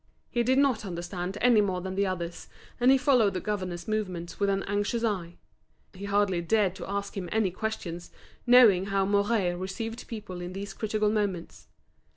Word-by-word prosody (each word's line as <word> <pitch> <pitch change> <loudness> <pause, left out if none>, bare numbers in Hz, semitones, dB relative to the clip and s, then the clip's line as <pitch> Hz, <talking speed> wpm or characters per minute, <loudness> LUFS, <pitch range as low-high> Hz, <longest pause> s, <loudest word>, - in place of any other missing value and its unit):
He 240 - +1
did 255 +3 +2
not 270 -6 +3
understand 180 +1 -5
any 240 -3 +5
more 190 -3 0
than 185 +1 -5
the 200 +1 +1
others, 175 -2 -4 0.3
and 245 +1 +4
he 270 - +7
followed 250 -7 +3
the - - 0
governor's 185 -4 -4
movements 185 -6 -3
with 200 -1 +2
an 195 0 0
anxious 205 +3 -1
eye. 180 -6 -2 0.6
He 195 +2 -8
hardly 200 -3 +1
dared 195 +1 +2
to - - -7
ask 200 0 -3
him 185 -3 -4
any 215 -4 +1
questions, 180 -4 -5 0.4
knowing 225 -7 +7
how 195 -1 +1
Mouret 200 -2 +1
received 225 +5 -5
people 205 -6 -7
in 175 +1 -6
these 200 +2 -6
critical 215 -1 0
moments. 200 -5 -3
200 Hz, 180 wpm, -28 LUFS, 185-220 Hz, 0.6 s, he